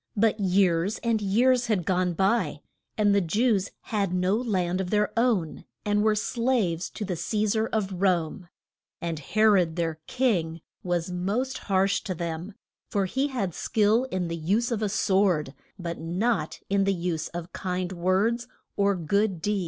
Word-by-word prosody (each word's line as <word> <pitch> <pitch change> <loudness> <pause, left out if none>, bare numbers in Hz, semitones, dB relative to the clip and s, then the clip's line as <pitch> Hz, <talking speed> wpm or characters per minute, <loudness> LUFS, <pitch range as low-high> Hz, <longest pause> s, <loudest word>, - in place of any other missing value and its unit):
But 215 +1 +2
years 190 0 +2
and 230 -2 +1
years 240 +5 +3
had 200 -7 0
gone 180 -1 +1
by, 195 +7 +1 0.4
and 205 -2 +4
the 200 - +4
Jews 205 +2 +1
had 200 -4 -1
no 180 +2 +2
land 190 -6 0
of 180 - -4
their 210 0 +1
own, 230 -9 +1 0.2
and 210 0 +2
were 215 0 +3
as 210 - -1
slaves 230 -9 0
to 210 - -5
the 185 -2 -2
Ce 210 +4 0
sar 220 +1 +1
of 200 -3 -2
Rome. 180 -1 0 0.5
And 165 -2 -3
He 215 +9 0
rod, 185 -7 +4
their 165 -2 -2
king, 175 -11 0 0.2
was 175 -1 -1
most 215 +9 -2
harsh 195 0 +1
to 185 - -3
them, 170 +4 -5 0.3
for 200 -2 +1
he 265 +9 0
had 205 - -2
skill 220 +7 +2
in 185 -8 -2
the 170 - -3
use 200 +10 0
of 225 -2 -1
a 210 - 0
sword, 190 -8 +1 0.2
but 170 -2 -5
not 185 +8 -1
in 195 0 +2
the 195 0 +2
use 170 -2 -2
of 175 0 -7
kind 185 -1 -3
words, 190 +7 +1 0.3
or 200 0 +2
good 190 +2 0
deeds. 205 +4 0
195 Hz, 175 wpm, -26 LUFS, 175-215 Hz, 0.5 s, and